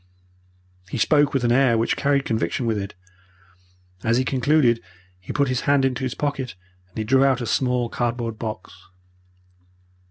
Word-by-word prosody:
"He - - -4
spoke 145 +5 +3
with 135 -3 -1
an 120 - +2
air 125 -2 +4
which 115 - +1
carried 140 -1 +1
conviction 110 +2 -1
with 110 -2 0
it. 100 +1 -6 1.1
As 115 +1 +2
he 130 - +1
concluded 130 -3 +2 0.4
he 90 - -8
put 140 -1 +1
his 130 -1 -1
hand 140 -2 +4
into 130 0 -1
his 130 -2 -2
pocket 135 -6 -3 0.3
and 95 - -15
he 110 - -1
drew 130 +5 +3
out 135 -2 +3
a 120 - -3
small 125 0 0
cardboard 115 -2 -3
box. 110 -2 -6
125 Hz, 165 wpm, -23 LUFS, 115-135 Hz, 1.1 s, air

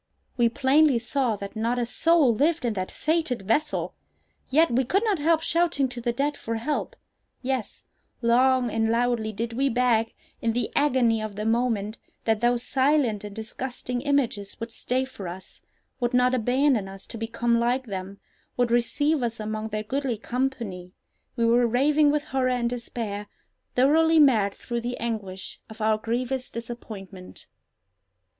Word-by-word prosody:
We 240 -2 +3
plainly 280 +2 +4
saw 245 0 0
that 200 +1 -8
not 230 +3 0
a 240 - 0
soul 305 +1 +3
lived 300 +4 +1
in 235 - +1
that 185 -2 -3
fated 310 -9 -1
vessel! 290 +10 0 0.6
Yet 315 +3 +4
we 250 +3 +2
could 390 - +1
not 415 -7 +1
help 320 +2 +2
shouting 330 -6 +1
to 245 -1 -7
the 240 0 0
dead 285 +5 -1
for 230 -4 -4
help! 245 +7 -2 0.5
Yes, 255 -3 -3 0.4
long 250 +1 +3
and 225 0 +1
loudly 230 -1 +1
did 230 +2 -4
we 270 +3 +1
beg, 230 -2 +1 0.3
in 230 -1 +1
the 240 -1 -1
agony 250 -6 +3
of 215 -2 -5
the 210 +1 -4
moment, 225 -2 0 0.2
that 220 -1 +1
those 240 0 +2
silent 265 -6 +2
and 205 -1 -8
disgusting 245 +2 -4
images 250 -8 -1
would 230 0 -5
stay 255 +3 -1
for 210 -8 -8
us, 180 +2 -9 0.4
would 245 0 0
not 250 0 +4
abandon 250 -3 +2
us 195 0 -8
to - - -8
become 235 +1 0
like 245 +2 +1
them, 195 -2 -6 0.4
would 245 -1 +2
receive 285 +5 +1
us 230 -2 -2
among 215 0 -3
their 215 -1 -3
goodly 260 +1 -2
company! 230 -7 -3 0.4
We 235 -2 +1
were 235 +1 +4
raving 290 +5 +3
with 295 0 +1
horror 265 -3 0
and 245 -1 0
despair—thoroughly 245 +7 0
mad 225 -10 +4
through 235 -1 -4
the 245 +1 -3
anguish 205 -5 -5
of 220 0 -11
our 215 0 +2
grievous 245 +3 -2
disappointment. 210 -5 -9
240 Hz, 160 wpm, -25 LUFS, 220-265 Hz, 0.6 s, plainly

